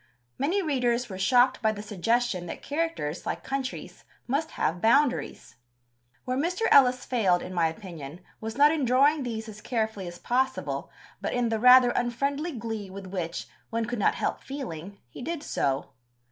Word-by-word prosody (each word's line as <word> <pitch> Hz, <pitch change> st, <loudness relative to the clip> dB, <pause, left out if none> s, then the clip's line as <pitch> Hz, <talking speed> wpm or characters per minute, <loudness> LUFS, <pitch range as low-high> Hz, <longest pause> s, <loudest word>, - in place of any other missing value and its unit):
Many 350 Hz, +9 st, +1 dB
readers 250 Hz, -5 st, 0 dB
were 190 Hz, -1 st, -6 dB
shocked 245 Hz, +6 st, +4 dB
by 220 Hz, -2 st, +3 dB
the 205 Hz, -1 st, -7 dB
suggestion 215 Hz, -2 st, 0 dB
that -, -, -7 dB
characters, 290 Hz, -, -2 dB
like -, -, -3 dB
countries, 270 Hz, -1 st, -5 dB, 0.2 s
must 285 Hz, +5 st, -1 dB
have 175 Hz, +2 st, 0 dB
boundaries. 255 Hz, -, +1 dB, 0.7 s
Where 255 Hz, +1 st, -1 dB
Mr. 355 Hz, +7 st, -1 dB
Ellis 255 Hz, -2 st, +6 dB
failed, 190 Hz, -8 st, +2 dB
in 185 Hz, -, -7 dB
my 170 Hz, -2 st, +3 dB
opinion, 165 Hz, -3 st, -8 dB, 0.2 s
was 220 Hz, +2 st, -6 dB
not 290 Hz, +1 st, +7 dB
in 315 Hz, -3 st, 0 dB
drawing 275 Hz, +5 st, +4 dB
these 230 Hz, -3 st, -4 dB
as 215 Hz, -1 st, -10 dB
carefully 220 Hz, -6 st, -2 dB
as 175 Hz, 0 st, -8 dB
possible, 260 Hz, +6 st, -1 dB, 0.3 s
but -, -, -2 dB
in 245 Hz, -1 st, +1 dB
the 225 Hz, -1 st, 0 dB
rather 250 Hz, +1 st, +8 dB
unfriendly 275 Hz, +8 st, -1 dB
glee 225 Hz, -4 st, -5 dB
with 195 Hz, +1 st, -8 dB
which, 180 Hz, -3 st, -4 dB, 0.2 s
one 230 Hz, 0 st, -1 dB
could 240 Hz, 0 st, -3 dB
not -, -, +3 dB
help -, -, -2 dB
feeling, 200 Hz, -, -7 dB
he 120 Hz, -, -11 dB
did 315 Hz, +2 st, -4 dB
so. 135 Hz, -, -1 dB
240 Hz, 170 wpm, -27 LUFS, 195-265 Hz, 0.7 s, rather